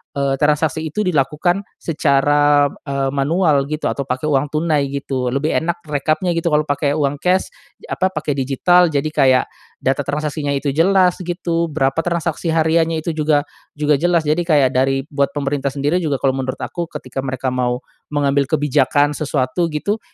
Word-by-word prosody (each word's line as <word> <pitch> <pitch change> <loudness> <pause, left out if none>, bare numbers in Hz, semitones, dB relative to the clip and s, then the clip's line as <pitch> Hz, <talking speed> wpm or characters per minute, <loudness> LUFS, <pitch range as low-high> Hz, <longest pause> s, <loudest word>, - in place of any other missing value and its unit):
eee, 140 -1 0
transaksi 150 +1 +1
itu 210 +8 -3
dilakukan 155 +2 +1 0.2
secara, 145 -1 +3 0.2
eee, 140 -1 -1
manual 145 0 +2
gitu 155 +1 -4
atau 140 - -3
pakai 130 +4 -2
uang 140 +1 +2
tunai 155 -2 +1
gitu, 135 -2 -3
lebih 145 +3 0
enak 170 +1 -3
rekapnya 155 +4 0
gitu 165 0 -1
kalau 150 0 +3
pakai 145 0 0
uang 145 -1 0
cash 180 +3 +1 0.3
ye - - -12
apa 185 - +1
pakai 155 -1 -2
digital 160 +7 +3
jadi 145 -2 -1
kayak 130 -3 +3 0.4
data 135 +2 0
transaksinya 150 -1 -2
itu 140 +1 -1
jelas 180 +4 +3
gitu, 170 -2 -2
berapa 135 +1 +1
transaksi 170 -1 -2
hariannya 160 0 +2
itu 170 - -1
juga 150 -1 +2 0.3
juga 150 -1 +2
jelas 175 -2 +2
jadi 155 +3 +1
kayak 145 -6 +4
dari 135 +1 +1
buat 140 -1 0
pemerintah 140 -1 -2
sendiri 145 +5 0
juga 150 -5 -1
kalau 135 - +3
menurut 130 -1 -3
aku 170 -2 -4
ketika 130 -2 -6
mereka 130 0 -2
mau 125 -1 -1 0.3
mengambil 140 -1 +1
kebijakan 145 -1 +2
sesuatu 150 +3 -1
gitu, 205 +8 -1
145 Hz, 165 wpm, -19 LUFS, 140-165 Hz, 0.4 s, kayak